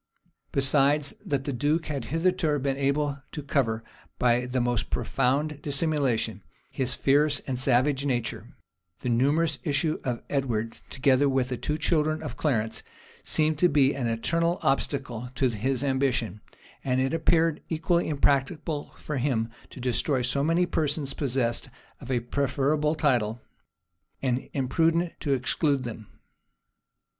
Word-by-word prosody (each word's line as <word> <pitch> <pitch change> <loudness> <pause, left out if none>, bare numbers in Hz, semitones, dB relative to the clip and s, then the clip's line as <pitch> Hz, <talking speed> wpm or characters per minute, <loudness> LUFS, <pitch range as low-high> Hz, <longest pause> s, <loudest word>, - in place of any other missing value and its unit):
Besides 140 +1 +3
that 140 -3 -1
the 140 - -3
duke 150 +6 +1
had 140 -6 -3
hitherto 165 -1 +1
been 135 -1 -1
able 140 +1 0
to 150 - -5
cover, 115 -6 0 0.3
by 125 0 +2
the 125 +1 -1
most 120 -3 0
profound 145 +3 0
dissimulation, 140 -7 0 0.3
his 130 0 -1
fierce 145 +1 +3
and 130 -2 -3
savage 130 +2 +3
nature, 120 -5 -2 0.5
the 125 - -2
numerous 145 +5 +2
issue 150 +2 0
of 125 -3 -3
Edward, 115 -5 -2
together 135 +1 +3
with 130 -1 +1
the 125 - -2
two 150 +5 -2
children 155 0 +1
of 140 -5 -5
Clarence, 115 -7 -1 0.4
seemed 155 -1 +1
to 180 - +5
be 140 -3 +4
an 130 -3 -2
eternal 165 +10 0
obstacle 135 -3 -1
to 130 0 +2
his 125 +4 -1
ambition; 130 -7 0 0.4
and 130 -1 +1
it 135 +3 +1
appeared 165 -1 +2
equally 165 +2 +1
impracticable 145 +1 0
for 150 - -4
him 120 -4 0 0.2
to - - -11
destroy 125 +2 0
so 125 +3 0
many 165 +3 +3
persons 150 -4 0
possessed 130 -4 -1 0.3
of - - -11
a 125 -2 +1
preferable 140 +4 0
title, 120 -7 +1 0.8
and 130 -1 -1
imprudent 165 +6 +1
to 140 - 0
exclude 135 +1 +1
them. 110 -3 -7
140 Hz, 140 wpm, -27 LUFS, 125-150 Hz, 0.8 s, to